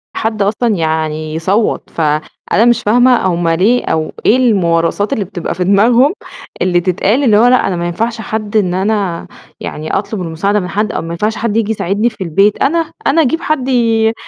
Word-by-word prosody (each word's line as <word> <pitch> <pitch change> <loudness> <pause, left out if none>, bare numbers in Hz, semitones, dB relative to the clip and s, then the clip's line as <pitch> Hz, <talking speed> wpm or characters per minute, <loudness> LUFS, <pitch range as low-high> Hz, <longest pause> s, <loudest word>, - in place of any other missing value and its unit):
حد 220 -2 -2
أصلًا 215 +2 +1
يعني 155 -2 -2
يصوّت، 195 +7 -1
فأنا 155 +7 -1
مش 240 -1 +3
فاهمة 245 +2 +3
هُم 175 -1 -1
ليه 200 +9 +2
أو 160 -1 -1
إيه 240 - +5
الموارثات 195 -2 +1
اللي 215 -7 -2
بتبقى 175 -3 -5
في 180 - -1
دماغهم 230 - +3 0.5
اللي 175 -1 +2
تتقال 200 +9 0
اللي 215 -5 +4
هو 235 - +5
لأ 250 -3 +3
أنا 190 - -1
ما 170 0 -3
ينفعش 225 +6 -3
حد 215 0 -3
إن 185 -4 +1
أنا 195 -3 -1 0.3
يعني 155 +1 -6
أطلب 205 0 -2
المساعدة 180 +5 -1
من 180 - -4
حد، 210 +4 -2
أو - - -3
ما 165 - -7
ينفعش 210 +6 -1
حد 225 -2 -2
ييجي 220 -1 0
يساعدني 210 +3 0
في 215 -4 -7
البيت 195 +5 +1
أنا، 325 +2 +1 0.2
أنا 325 +4 +3
أجيب 320 +3 0
حد 280 -4 -1
ي 225 -3 +2
205 Hz, 190 wpm, -14 LUFS, 175-230 Hz, 0.5 s, إيه